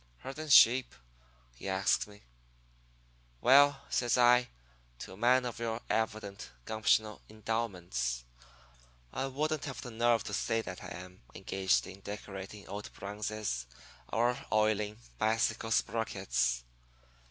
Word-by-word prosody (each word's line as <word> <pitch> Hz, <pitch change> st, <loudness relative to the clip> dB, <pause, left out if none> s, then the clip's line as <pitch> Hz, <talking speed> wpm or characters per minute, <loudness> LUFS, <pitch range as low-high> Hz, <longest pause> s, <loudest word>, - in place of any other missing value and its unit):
"'Herdin' 155 Hz, +3 st, -6 dB
sheep?' 130 Hz, -2 st, +7 dB, 0.6 s
he 80 Hz, +11 st, -7 dB
asks 95 Hz, +2 st, +2 dB
me. 105 Hz, 0 st, -16 dB, 1.2 s
"'Well,' 140 Hz, -, +6 dB
says 120 Hz, 0 st, +2 dB
I, 125 Hz, 0 st, +5 dB, 0.5 s
'to -, -, -9 dB
a -, -, -12 dB
man 125 Hz, +3 st, +4 dB
of 120 Hz, -2 st, -5 dB
your 115 Hz, -1 st, -2 dB
evident 110 Hz, -3 st, -2 dB, 0.2 s
gumptional 110 Hz, -1 st, +1 dB
endowments, 100 Hz, -, -2 dB, 0.9 s
I 135 Hz, -, -1 dB
wouldn't 150 Hz, +3 st, -1 dB
have 135 Hz, -4 st, -6 dB
the 125 Hz, -, -7 dB
nerve 115 Hz, 0 st, +2 dB
to -, -, -6 dB
state 115 Hz, 0 st, 0 dB
that 90 Hz, 0 st, -7 dB
I -, -, -7 dB
am 90 Hz, +1 st, -10 dB
engaged 95 Hz, -1 st, +1 dB
in 95 Hz, +1 st, -10 dB
decorating 100 Hz, 0 st, -8 dB
old 105 Hz, +1 st, -6 dB
bronzes 105 Hz, -, -4 dB, 0.4 s
or 120 Hz, +2 st, +1 dB
oiling 105 Hz, -1 st, +1 dB, 0.2 s
bicycle 110 Hz, +1 st, +1 dB
sprockets.' 95 Hz, -, 0 dB
110 Hz, 120 wpm, -32 LUFS, 100-120 Hz, 1.2 s, sheep